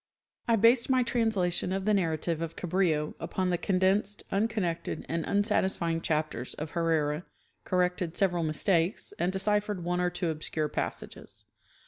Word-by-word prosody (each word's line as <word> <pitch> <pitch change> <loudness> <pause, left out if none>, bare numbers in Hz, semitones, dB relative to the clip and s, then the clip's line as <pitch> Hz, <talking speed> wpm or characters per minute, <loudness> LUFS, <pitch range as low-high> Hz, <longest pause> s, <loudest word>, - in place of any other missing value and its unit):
I 230 - +4
based 230 +4 +5
my 260 -1 +4
translation 210 -8 +1
of 190 0 -2
the 215 - +3
narrative 165 -3 0
of 165 -1 -4
Cabrillo 170 -4 0
upon 185 -1 -1
the 175 - +1
condensed, 195 +2 +1
unconnected 200 -5 -1
and 165 0 -1
unsatisfying 190 -5 +1
chapters 155 -6 -1
of 155 0 -5
Herrera 160 -2 0 0.4
corrected 180 -2 0
several 180 -3 +2
mistakes 165 +3 0
and 175 +2 +1
deciphered 205 0 0
one 180 +1 0
or 180 - +2
two 175 -1 -1
obscure 155 0 -2
passages. - - -4
180 Hz, 140 wpm, -29 LUFS, 165-200 Hz, 0.4 s, based